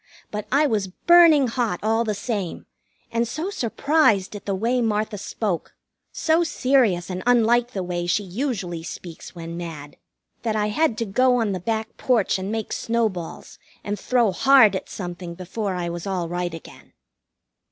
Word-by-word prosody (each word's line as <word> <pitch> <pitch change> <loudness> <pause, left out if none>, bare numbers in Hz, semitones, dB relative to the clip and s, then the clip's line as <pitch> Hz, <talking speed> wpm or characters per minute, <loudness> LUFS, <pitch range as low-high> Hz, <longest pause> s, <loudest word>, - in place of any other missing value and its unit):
But 210 0 -4
I 285 +3 +4
was 215 -8 0
burning 320 - +5
hot 230 -6 -1
all 225 +2 +2
the 215 -2 -2
same, 200 -4 -4 0.5
and 235 0 0
so 320 - -4
surprised 230 - +2
at 205 - -9
the 195 - 0
way 235 +6 +1
Martha 215 -2 -1
spoke, 200 -4 -3 0.4
so 320 +1 +2
serious 250 - +2
and 180 0 -4
unlike 240 0 +3
the 190 - -2
way 175 -1 -3
she 200 +4 +1
usually 195 - -3
speaks 170 +1 -9
when 165 0 -7
mad, 155 -4 -7 0.4
that 225 -2 -1
I 210 -1 +1
had 240 +1 +1
to 230 - -1
go 250 +5 +3
on 225 -4 +1
the 185 - -2
back 220 +4 -3
porch 230 -7 +1
and 190 +2 -4
make 220 -1 -3
snowballs 220 -7 -3 0.2
and 205 0 -3
throw 240 -5 +2
hard 220 +1 +6
at 190 - -5
something 175 -2 -6
before 190 +2 -4
I 175 -1 -2
was 170 +2 -5
all 185 -3 -2
right 175 +1 -2
again. 165 - -13
210 Hz, 170 wpm, -23 LUFS, 180-240 Hz, 0.5 s, hard